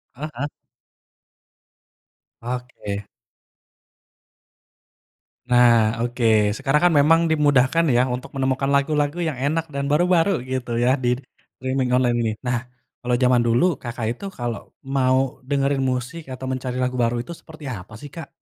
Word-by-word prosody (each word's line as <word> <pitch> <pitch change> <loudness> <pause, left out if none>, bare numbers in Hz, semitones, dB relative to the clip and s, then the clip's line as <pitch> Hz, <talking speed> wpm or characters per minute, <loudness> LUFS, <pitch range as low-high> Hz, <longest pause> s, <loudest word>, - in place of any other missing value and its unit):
Heeh. 145 -1 -4 1.9
Oke. 120 -4 -5 2.4
Nah, 120 -1 +6 0.2
oke, 120 +1 -2 0.3
sekarang 140 +3 +1
kan, 170 - +2
memang 165 +3 +5
dimudahkan 145 +1 +3
ya, 120 0 +4
untuk 125 0 -4
menemukan 135 0 0
lagu-lagu 145 +3 +1
yang 155 - -2
enak, 150 +6 -1
dan 140 - -1
baru-baru, 175 +3 +3
gitu 130 -2 -3
ya, 125 +2 +3
di 125 -2 0 0.4
streaming 130 -1 -1
online 125 -1 +3
ini. 110 - 0 0.2
Nah, 120 -1 0 0.4
kalau 125 0 +1
jaman 125 -1 +4
dulu, 120 +10 +3
Kakak 120 -2 -5
itu 200 - -9
kalau 120 -7 -5 0.2
mau 130 0 +1
dengerin 140 0 0
musik, 130 +7 -4
atau 130 +1 -6
mencari 130 -1 -3
lagu 125 0 -1
baru, 120 -1 +1
itu 170 +9 -6
seperti 155 -2 -12
apa 105 -5 -7
sih, 145 - -9
Kak? 165 -4 -7
130 Hz, 135 wpm, -22 LUFS, 125-145 Hz, 2.4 s, Nah